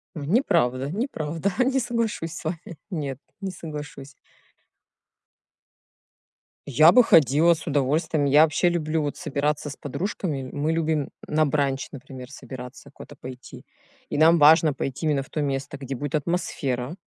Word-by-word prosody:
Неправда, 145 Hz, -, +1 dB
неправда, 170 Hz, -, -2 dB, 0.2 s
не 265 Hz, +1 st, +2 dB
соглашусь 230 Hz, -9 st, -2 dB
с 165 Hz, -, -8 dB
вами 165 Hz, 0 st, -5 dB
нет, 145 Hz, -7 st, -3 dB, 0.2 s
не 195 Hz, -, -3 dB
соглашусь. 150 Hz, -5 st, -8 dB, 2.5 s
Я 155 Hz, +5 st, +6 dB
бы 250 Hz, -, +7 dB
ходила 160 Hz, -, +5 dB
с 165 Hz, -, -11 dB
удовольствием. 145 Hz, +2 st, +1 dB
Я 145 Hz, +3 st, +6 dB
вообще 160 Hz, +3 st, +2 dB
люблю, 160 Hz, -2 st, -1 dB
вот, 145 Hz, -1 st, -3 dB
собираться 150 Hz, -2 st, -2 dB
с 145 Hz, -, -7 dB
подружками, 145 Hz, -2 st, -4 dB
мы 150 Hz, +2 st, -1 dB
любим 160 Hz, -3 st, 0 dB, 0.2 s
на 155 Hz, +1 st, +2 dB
бранч, 140 Hz, -2 st, -1 dB
например, 130 Hz, -1 st, -10 dB
собираться 125 Hz, -2 st, -10 dB
куда-то -, -, -12 dB
пойти. 130 Hz, 0 st, -10 dB, 0.4 s
И -, -, -2 dB
нам 165 Hz, +2 st, +6 dB
важно 155 Hz, +1 st, +6 dB
пойти 135 Hz, +3 st, -4 dB
именно 145 Hz, -3 st, +1 dB
в -, -, -18 dB
то 155 Hz, -, -3 dB
место, 140 Hz, -1 st, -3 dB
где 135 Hz, -1 st, -5 dB
будет 145 Hz, +3 st, -3 dB
атмосфера. 145 Hz, -4 st, -2 dB
150 Hz, 140 wpm, -24 LUFS, 140-165 Hz, 2.5 s, бы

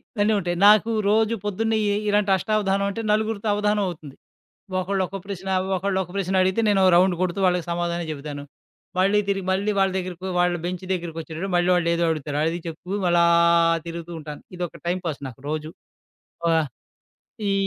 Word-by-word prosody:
ఇవన్నీ 210 Hz, 0 st, +2 dB
ఉంటాయి. 175 Hz, -2 st, -2 dB
నాకు 215 Hz, +1 st, +6 dB, 0.2 s
రోజు 220 Hz, +2 st, +3 dB
పొద్దున్నే 220 Hz, +2 st, 0 dB, 0.2 s
ఎ -, -, +1 dB
ఇలాంటి 205 Hz, -1 st, +2 dB
అష్టావధానం 200 Hz, -1 st, 0 dB
అంటే 225 Hz, -, -4 dB
నలుగురితో 215 Hz, 0 st, 0 dB
అవదానం 210 Hz, 0 st, +1 dB
అవుతుంది. 155 Hz, -5 st, -8 dB, 0.6 s
ఒకళ్ళు 190 Hz, +1 st, 0 dB
ఒక్క 195 Hz, -, -6 dB
ప్రశ్న, 195 Hz, -1 st, -6 dB, 0.3 s
ఒకళ్ళు 190 Hz, +1 st, -1 dB
ఒక 175 Hz, -, -13 dB
ప్రశ్న 190 Hz, -1 st, -1 dB
అడిగితే 190 Hz, +4 st, +1 dB
నేనో 195 Hz, -2 st, +3 dB
రౌండు 180 Hz, +1 st, +4 dB
కొడుతూ 185 Hz, +1 st, -1 dB
వాళ్ళకి 180 Hz, -2 st, +1 dB
సమాధానం 170 Hz, 0 st, -2 dB
చెప్తాను. 145 Hz, -1 st, -6 dB, 0.6 s
మళ్ళీ 200 Hz, +2 st, +4 dB
తిరిగి, 195 Hz, -1 st, -1 dB
మళ్ళీ 200 Hz, +3 st, +1 dB
వాళ్ళ 195 Hz, 0 st, +3 dB
దగ్గరకో 185 Hz, 0 st, -5 dB
వాళ్ళ 175 Hz, 0 st, +2 dB
బెంచి 180 Hz, +1 st, -4 dB
దగ్గరికొచ్చేటప్పటికి 165 Hz, +1 st, -5 dB
మళ్ళీ 175 Hz, +1 st, +2 dB
వాళ్ళేదో 170 Hz, -1 st, +1 dB
అడుగుతారు, 150 Hz, -2 st, -3 dB
అది 170 Hz, +2 st, -2 dB
చెప్తూ 180 Hz, +5 st, -5 dB
అలా 170 Hz, 0 st, +5 dB, 0.6 s
తిరుగుతూ 170 Hz, 0 st, -6 dB
ఉంటాను. 150 Hz, -1 st, -8 dB, 0.2 s
ఇదొక 175 Hz, -2 st, -5 dB
టైమ్ 180 Hz, +1 st, 0 dB
పాస్ 150 Hz, -4 st, -4 dB
నాకు 125 Hz, +1 st, -15 dB
రోజు. 155 Hz, 0 st, -3 dB, 0.8 s
ఆహ్, 160 Hz, -2 st, +2 dB, 0.8 s
ఈ -, -, +2 dB
185 Hz, 165 wpm, -23 LUFS, 170-200 Hz, 0.8 s, నాకు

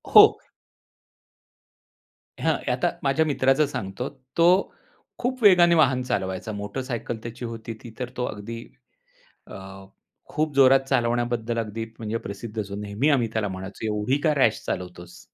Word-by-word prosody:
हो. -, -, +9 dB, 2.0 s
हां. -, -, +2 dB
आता -, -, +1 dB
माझ्या 140 Hz, +3 st, +2 dB
मित्राचं 135 Hz, 0 st, +3 dB
सांगतो. 125 Hz, -3 st, -4 dB, 0.3 s
तो 180 Hz, +3 st, +4 dB, 0.5 s
खूप 250 Hz, -1 st, -3 dB
वेगाने 175 Hz, -4 st, +7 dB
वाहन 135 Hz, -5 st, +4 dB
चालवायचा. 95 Hz, -3 st, -2 dB
मोटरसायकल 115 Hz, +3 st, -4 dB
त्याची 120 Hz, +1 st, -6 dB
होती 115 Hz, 0 st, -6 dB
ती 115 Hz, -2 st, -10 dB
तर 125 Hz, -1 st, -3 dB
तो 125 Hz, -, 0 dB
अगदी 115 Hz, +2 st, -6 dB, 0.8 s
अ, -, -, -10 dB, 0.7 s
खूप 155 Hz, -1 st, -1 dB
जोरात 135 Hz, 0 st, +7 dB
चालवण्याबद्दल 120 Hz, -2 st, 0 dB
अगदी 115 Hz, +1 st, -4 dB
म्हणजे 110 Hz, 0 st, -2 dB
प्रसिद्ध 105 Hz, +2 st, -5 dB
जो 100 Hz, 0 st, -6 dB
नेहमी 105 Hz, +8 st, -1 dB
आम्ही 130 Hz, -5 st, +3 dB
त्याला 110 Hz, -2 st, 0 dB
म्हणायचो 95 Hz, +3 st, -7 dB
एवढी 105 Hz, +5 st, 0 dB
का 155 Hz, -2 st, +3 dB
रॅश 115 Hz, -6 st, +3 dB
चालवतोस? 90 Hz, -1 st, -6 dB
120 Hz, 135 wpm, -25 LUFS, 105-135 Hz, 2.0 s, हो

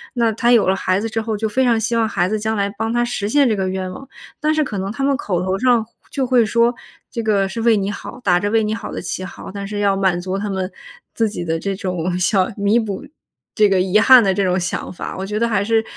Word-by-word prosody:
那 230 Hz, -2 st, +2 dB
他 240 Hz, +2 st, +2 dB
有 235 Hz, -5 st, +5 dB
了 190 Hz, -, +3 dB
孩 185 Hz, 0 st, 0 dB
子 225 Hz, -, -3 dB
之 225 Hz, +1 st, -2 dB
后， 220 Hz, -1 st, -3 dB
就 220 Hz, +1 st, -1 dB
非 260 Hz, +5 st, +1 dB
常 235 Hz, -3 st, +3 dB
希 225 Hz, +2 st, -1 dB
望 225 Hz, -1 st, +2 dB
孩 175 Hz, -4 st, +1 dB
子 215 Hz, +3 st, -1 dB
将 220 Hz, +1 st, -2 dB
来 200 Hz, 0 st, 0 dB
帮 225 Hz, +2 st, -3 dB
他 240 Hz, 0 st, +1 dB
实 215 Hz, -4 st, -3 dB
现 280 Hz, +1 st, +4 dB
这 220 Hz, -, +1 dB
个 190 Hz, -1 st, -1 dB
愿 185 Hz, 0 st, -3 dB
望。 270 Hz, +9 st, -9 dB, 0.4 s
但 305 Hz, +1 st, +2 dB
是 310 Hz, -1 st, +1 dB
可 215 Hz, -6 st, -5 dB
能 195 Hz, +2 st, -3 dB
他 275 Hz, -, -6 dB
们 275 Hz, 0 st, +2 dB
口 185 Hz, -10 st, -2 dB
头 185 Hz, +1 st, -1 dB
上 240 Hz, -1 st, +3 dB, 0.3 s
就 270 Hz, -2 st, -1 dB
会 245 Hz, -2 st, +4 dB
说： 235 Hz, +2 st, +2 dB, 0.3 s
“这 230 Hz, -, -4 dB
个 200 Hz, -3 st, +2 dB
是 230 Hz, +3 st, -5 dB
为 225 Hz, -1 st, +4 dB
你 195 Hz, 0 st, -1 dB
好”， 205 Hz, +4 st, -7 dB
打 175 Hz, -6 st, +3 dB
着 205 Hz, +3 st, -1 dB
为 225 Hz, 0 st, +3 dB
你 215 Hz, +1 st, -1 dB
好 225 Hz, -1 st, -7 dB
的 -, -, -5 dB
旗 185 Hz, -, -4 dB
号， 185 Hz, -, -9 dB
但 200 Hz, +1 st, -6 dB
是 205 Hz, +1 st, -4 dB
要 200 Hz, -1 st, +2 dB
满 190 Hz, -2 st, +1 dB
足 185 Hz, +2 st, -3 dB
他 205 Hz, +1 st, -3 dB
们 190 Hz, -1 st, -2 dB, 0.4 s
自 225 Hz, -2 st, +1 dB
己 175 Hz, -4 st, -5 dB
的 165 Hz, 0 st, -1 dB
这 195 Hz, +4 st, -3 dB
种 180 Hz, -2 st, -2 dB
想 190 Hz, +2 st, +1 dB
弥 205 Hz, +2 st, +2 dB
补 205 Hz, -4 st, -4 dB, 0.5 s
这 210 Hz, -2 st, +5 dB
个 190 Hz, -2 st, +2 dB
遗 190 Hz, +3 st, +3 dB
憾 245 Hz, +1 st, +8 dB
的 195 Hz, -, +2 dB
这 200 Hz, -, +1 dB
种 185 Hz, 0 st, +1 dB
想 180 Hz, +1 st, -3 dB
法， -, -, -6 dB
我 190 Hz, -, -4 dB
觉 210 Hz, +2 st, -3 dB
得 235 Hz, -, +2 dB
还 205 Hz, -2 st, +1 dB
是 225 Hz, +1 st, +2 dB
210 Hz, 300 characters per minute, -19 LUFS, 190-230 Hz, 0.5 s, 憾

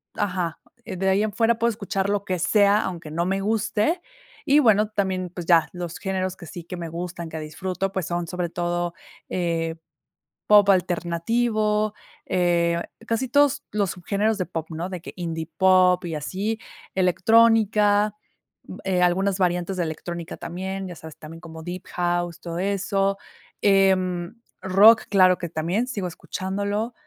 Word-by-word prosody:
Ajá, 180 Hz, -5 st, -2 dB, 0.3 s
de 190 Hz, +1 st, -1 dB
ahí 200 Hz, +2 st, +3 dB
en 215 Hz, -, -1 dB
fuera 230 Hz, 0 st, +2 dB
puedo 235 Hz, -, +3 dB
escuchar 200 Hz, -2 st, -2 dB
lo 205 Hz, -1 st, 0 dB
que 185 Hz, -1 st, -1 dB
sea, 205 Hz, +3 st, +4 dB
aunque 170 Hz, -4 st, -5 dB
no 170 Hz, +2 st, -1 dB
me 195 Hz, +1 st, 0 dB
guste. 220 Hz, -, 0 dB, 0.5 s
Y 285 Hz, +2 st, +5 dB
bueno, 215 Hz, -5 st, +4 dB
también, 190 Hz, -4 st, -1 dB
pues, 175 Hz, -2 st, -6 dB
ya 170 Hz, -2 st, +5 dB
los 175 Hz, -2 st, -5 dB
géneros 185 Hz, -2 st, -2 dB
que 170 Hz, -, -10 dB
sí 170 Hz, +2 st, -8 dB
que 180 Hz, -, -7 dB
me 170 Hz, -1 st, -5 dB
gustan, 170 Hz, 0 st, -6 dB
que 160 Hz, -, -6 dB
disfruto, 185 Hz, +5 st, -3 dB
pues, 190 Hz, -4 st, -2 dB
son 175 Hz, -1 st, -2 dB
sobre 180 Hz, -1 st, -3 dB
todo, 175 Hz, 0 st, -2 dB, 0.4 s
eh, 165 Hz, -2 st, -1 dB, 0.7 s
pop 205 Hz, -1 st, +6 dB
alternativo, 210 Hz, +4 st, +1 dB, 0.3 s
eh, 170 Hz, -2 st, +1 dB, 0.3 s
casi 240 Hz, +2 st, -1 dB
todos 285 Hz, +1 st, +3 dB
los 200 Hz, -3 st, 0 dB
subgéneros 205 Hz, +4 st, -1 dB
de 185 Hz, -, -1 dB
pop, 165 Hz, -2 st, -5 dB
¿no? 170 Hz, +4 st, -4 dB
De 180 Hz, -3 st, -6 dB
que -, -, -9 dB
indie 165 Hz, -2 st, -4 dB
pop 185 Hz, -1 st, +5 dB
y 165 Hz, -2 st, -3 dB
así 200 Hz, +9 st, -3 dB, 0.4 s
electrónica. 210 Hz, +2 st, +4 dB, 0.7 s
Eh, 185 Hz, -2 st, +1 dB
algunas 190 Hz, +2 st, +2 dB
variantes 180 Hz, +1 st, 0 dB
de 175 Hz, -, +1 dB
electrónica 170 Hz, +1 st, -5 dB
también, 190 Hz, +3 st, -5 dB
ya 175 Hz, -, -8 dB
sabes, 160 Hz, -1 st, -11 dB
también 165 Hz, +2 st, -10 dB
como 160 Hz, -2 st, -10 dB
Deep 175 Hz, +2 st, -6 dB
House 175 Hz, -1 st, -1 dB
todo 170 Hz, 0 st, -5 dB
eso, 195 Hz, 0 st, 0 dB, 0.4 s
em, 190 Hz, -1 st, +2 dB, 0.2 s
rock 205 Hz, +4 st, +6 dB
claro 185 Hz, -2 st, +5 dB
que 175 Hz, -, -4 dB
también 175 Hz, +10 st, -1 dB
sigo 200 Hz, -7 st, -3 dB
escuchándolo. 200 Hz, +6 st, -3 dB
185 Hz, 155 wpm, -24 LUFS, 175-205 Hz, 0.7 s, pop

